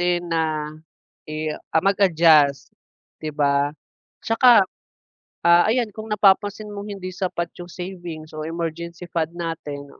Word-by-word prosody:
din 175 0 +1
na 155 -2 -1 0.6
i 155 0 -3
ah, 160 - -2
mag-adjust 160 -9 +4 0.5
'di 155 -1 -4
ba. 140 -1 +2 0.6
Tsaka, 225 -2 +6 0.8
ah, 170 0 +7
ayan 245 0 +2
kung 215 0 -7
napapansin 205 +1 +2
mong 205 +1 -7
hindi 185 -2 -6
sapat 180 -2 -2
yung 175 0 -9
savings 175 -4 -8
o 155 - -4
emergency 170 +1 -5
fund 165 -1 -1
natin 160 -4 -5
170 Hz, 125 wpm, -22 LUFS, 155-190 Hz, 0.8 s, ah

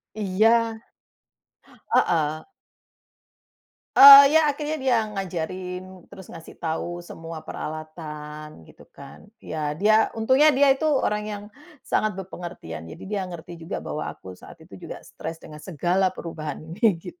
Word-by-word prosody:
Iya. 220 +3 +2 1.2
Heeh. 155 -2 +1 1.5
Eee, 280 +1 +11
ya 305 - +2
akhirnya 295 +2 -2
dia 260 -2 +2 0.2
ngajarin, 185 0 -6
terus 190 -2 -12
ngasih 165 -1 -12
tau 175 +1 -4
semua 165 -2 -9
peralatan 155 - -8
gitu - - -18
kan. 140 +8 -13
Ya 150 -7 -5
dia, 215 +5 +3
untungnya 260 +7 +4
dia 275 0 +5
itu 310 +4 -1 0.2
orang 210 0 -1
yang 205 -1 -6 0.4
sangat 215 -3 -1
bepengertian. 175 - -8
Jadi 80 - -11
dia 200 0 -3
ngerti 175 0 -9
juga 165 +4 -6
bahwa 150 - -4
aku 95 - -10
saat 90 - -14
itu - - -14
juga - - -6
stres 165 - -8
dengan 150 -1 -11
segala 185 +3 0
perubahan 160 -5 -7 0.2
ini, 215 +5 +3 0.2
gitu. 345 +1 -10
180 Hz, 135 wpm, -24 LUFS, 155-215 Hz, 1.5 s, Eee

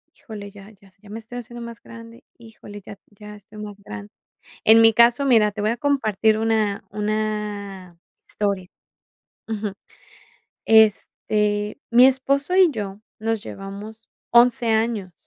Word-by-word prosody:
“Híjole, 205 -3 -10
ya 200 0 -14
ya 200 -1 -22
s 185 0 -26
ya 205 - -17
me 220 +2 -7
estoy 245 +2 -8
haciendo 240 0 -9
más 235 0 -10
grande, 230 0 -13
híjole, 215 -3 -13
ya 205 - -9 0.2
ya 210 +1 -12
estoy 210 +1 -15
más 205 -1 -8
grande”. 105 0 -9 0.5
En 225 +1 +7
mi 225 -1 +6
caso, 240 +4 +4
mira, 220 -5 +4
te 205 0 -6
voy 215 +2 +1
a 240 - -3
compartir 220 -6 +1
una 220 -2 0
una 210 -3 -4 0.2
historia 200 -3 -3 0.8
Ujú. 210 -2 -3 0.9
Este, 210 -1 +2
mi 245 +2 +7
esposo 275 +5 +1
y 375 -3 +6
yo 205 -4 -6 0.2
nos 225 -1 -2
llevamos 205 +3 -9 0.2
11 240 0 +4
años. 220 -4 -1
215 Hz, 145 wpm, -22 LUFS, 205-230 Hz, 0.9 s, En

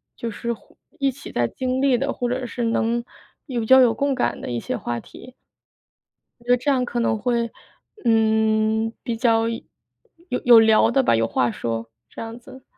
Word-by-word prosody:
就 230 -1 -5
是 235 +3 -3
或 220 - -18 0.2
一 275 -1 +2
起 280 +3 -11
在 120 -1 +1
经 255 - -2
历 270 -3 +3
的， 275 +2 -1
或 245 -1 -2
者 255 +1 -2
是 240 0 -4
能 230 +1 0 0.4
有 240 -5 -2
较 260 +3 +7
有 240 -3 +4
共 280 -1 0
感 250 - -1
的 - - -6
一 120 - -2
些 - - -4
话 120 0 -4
题。 255 - -14 1.1
我 235 - -22
觉 245 - +1
得 245 - +6
这 285 +4 0
样 255 -2 +1
可 240 0 -3
能 225 -1 +1
会， 235 0 -1 0.5
嗯， 220 0 +2
比 230 -2 -3
较 230 -1 +2
有 230 - -4 0.8
有 240 -2 +9
聊 220 -1 +5
的 270 - +2
吧， - - +3
有 115 0 +1
话 120 +1 +1
说， 115 0 -4 0.2
这 - - -9
样 230 +1 -7
子。 260 +2 -14
235 Hz, 210 characters per minute, -22 LUFS, 220-255 Hz, 1.1 s, 有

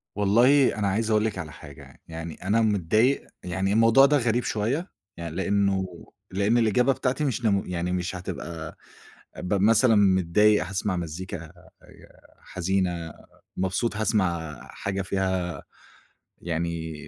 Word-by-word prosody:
والله 120 +7 +4
أنا 100 - +1
عايز 110 +3 0
أقول 110 0 +3
لِك 110 - -2
على 80 -4 -6
حاجة 70 -4 -12
يعني، - - -17
يعني 80 0 -6
أنا 115 +3 +3
متضايق، 110 +5 +2 0.2
يعني 95 +3 -1
الموضوع 115 +4 +6
ده 145 +1 +3
غريب 120 -1 0
شوية 130 - -2 0.3
يعني، 85 -1 -6
لإنه 100 0 +1 0.5
لإن 100 +5 +2
الإجابة 120 +4 +3
بتاعتي 130 +4 -1
مش 120 -3 -2
نمو 100 -3 +2
يعني 90 0 -3
مش 90 +1 -2
هتبقى 85 -3 -7 0.6
أبقى 95 +2 -2
مثلًا 115 +3 +5
متضايق 100 +1 +4
هاسمَع 95 0 -2
مزيكا 85 +2 -5
آآ - - -19 0.7
حزينة، 90 -3 -2 0.4
مبسوط 95 +5 -1
هاسمَع 85 -8 -1
حاجة 100 -1 -3
فيها 95 -2 -2 0.8
يعني 85 -1 -3
95 Hz, 135 wpm, -25 LUFS, 85-110 Hz, 0.8 s, الموضوع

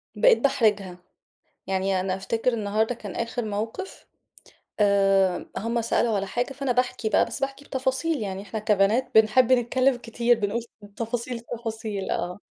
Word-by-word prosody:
بقيت - - +5
باحرجها. 205 -9 +1 0.7
يعني 190 0 0
أنا 185 0 -1
أفتكر 225 +5 -1
النهاردة 220 +2 0
كان 205 -4 -8
آخر 230 0 -3
موقف، 220 - -5 0.7
آآ، 195 -2 +3
هُم 230 +2 -1
سألوا 230 0 +1
على 200 0 -1
حاجة، 245 +6 -2
فأنا 275 -1 -2
باحكي 250 -2 0
بقى - - +4
بس - - -6
باحكي 275 +1 -4
بتفاصيل، 265 +5 -1
يعني 195 -2 -4
إحنا 210 +2 -5
كبنات 210 +4 +2
بنحب 220 +3 +5
نتكلم 255 +2 +3
كتير، 235 0 +1
بنقول 210 +3 -1 0.3
تفاصيل 235 +2 -3
التفاصيل 225 -4 -5
آه، 180 +2 -3
225 Hz, 145 wpm, -25 LUFS, 200-245 Hz, 0.7 s, بقيت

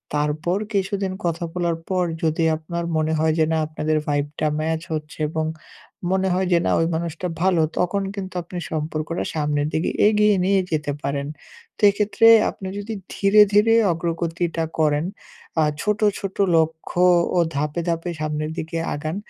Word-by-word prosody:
তারপর 150 +5 0 0.2
কিছুদিন 195 -1 -1
কথা 170 0 -1
বলার 170 -2 -1
পর 185 -1 +1 0.2
যদি 160 +1 +1
আপনার 170 +2 -5
মনে 155 0 +1
হয় 160 0 +2
যে, 160 - +5
না 160 - +2
আপনাদের 155 0 -1
ভাইভ 145 -1 +1
টা 155 - +2
match 160 +1 -1
হচ্ছে 150 -1 -5
এবং 160 0 -2 0.7
মনে 190 0 +1
হয় 185 +1 0
যে, 175 - +5
"না! - - +2
ওই 165 - +2
মানুষটা 170 +2 -3
ভালো" 180 -2 +3 0.2
তখন 180 +3 +1
কিন্তু 190 -2 -6
আপনি 180 +1 -8
সম্পর্কটা 155 +1 -2
সামনের 150 -2 0
দিকে 160 - 0 0.2
এগিয়ে 210 -1 +4
নিয়ে 195 +1 +3
যেতে 150 -2 -1
পারেন। 140 0 -2 0.5
তো - - -13
এক্ষেত্রে 210 +3 +2 0.2
আপনি 190 - -7
যদি 205 +2 -5 0.2
ধীরে, 205 +1 +5
ধীরে 210 +2 +5 0.2
অগ্রগতিটা 170 0 -2 0.2
করেন 150 0 +2 0.6
আ - - +4 0.2
ছোট, 210 +1 0 0.2
ছোট 195 -1 -5 0.2
লক্ষ্য 160 +2 0 0.3
ও - - +5 0.2
ধাপে, 150 +4 -1
ধাপে 165 +1 -2
সামনের 155 0 -2
দিকে 160 +1 -4 0.2
আগান, 155 +3 -4
165 Hz, 160 wpm, -22 LUFS, 155-185 Hz, 0.7 s, যে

